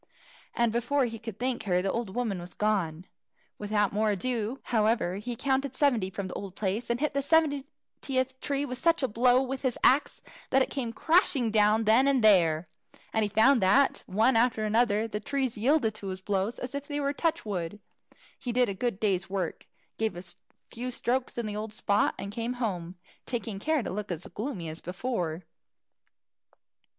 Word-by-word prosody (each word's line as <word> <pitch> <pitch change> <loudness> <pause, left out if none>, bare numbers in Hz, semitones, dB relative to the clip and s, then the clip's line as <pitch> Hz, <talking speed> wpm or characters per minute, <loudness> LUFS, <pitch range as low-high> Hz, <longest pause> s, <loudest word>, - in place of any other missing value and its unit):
And 235 -1 +2
before 245 +4 +1
he 225 -2 -5
could 225 -3 -7
thank 245 -1 -2
her, 180 -2 +2
the 190 +1 0
old 230 -5 -3
woman 225 -7 -1
was 175 +1 -9
gone. 185 -6 0 0.5
Without 205 -1 0
more 215 +1 +2
ado, 230 +4 -1
however, 215 -5 +1
he 235 +4 -4
counted 270 +1 -1
seventy 245 -11 +2
from 195 0 -5
the - - -7
old 195 -2 -7
place, 210 +4 -2
and 235 0 0
hit 300 +1 0
the 280 - +1
seventieth 275 -3 -1
tree 280 0 -1
such 330 +4 +2
a - - +3
blow 250 +3 +3
with 265 0 -4
his 260 -3 0
axe, 275 +3 +3 0.3
that 270 0 +4
it - - -6
came 250 -5 -2
crashing 280 - +2
down 215 +1 +4
then 225 +5 +5
and 270 -4 +3
there. 170 -6 +4 0.5
And 220 - +2
he 210 - +1
found 225 +5 +4
that, 235 +9 +3
one 220 +6 +3
after 225 -1 +2
another, 220 0 +2
the 210 -1 -4
trees 265 +1 -2
yielded 230 0 +2
to 210 -2 -8
his 185 -1 -4
blows 200 +3 -1
as 250 +1 -6
if 280 0 -4
they 290 -1 -3
were 280 0 0
touch 320 -3 -1
wood. 195 -1 -4 0.6
He 245 - -3
did 245 -1 +2
a - - -2
good 215 0 -2
day's 190 -3 0
work, 190 -4 -3 0.3
gave 220 -3 0
a 175 - -7 0.5
few 245 +2 -4
strokes 250 +1 -2
in 235 - -2
the 210 -1 -4
old 215 0 -5
spot, 205 +1 +1
and 200 - -6
came 230 +3 -3
home, 185 -8 -3 0.3
taking 230 -5 -3
care 310 +3 +1
to - - -4
look 205 0 -4
as 170 0 -3
gloomy 210 - -5
as 160 +1 -7
before. 180 -4 -3
225 Hz, 190 wpm, -28 LUFS, 200-260 Hz, 0.6 s, then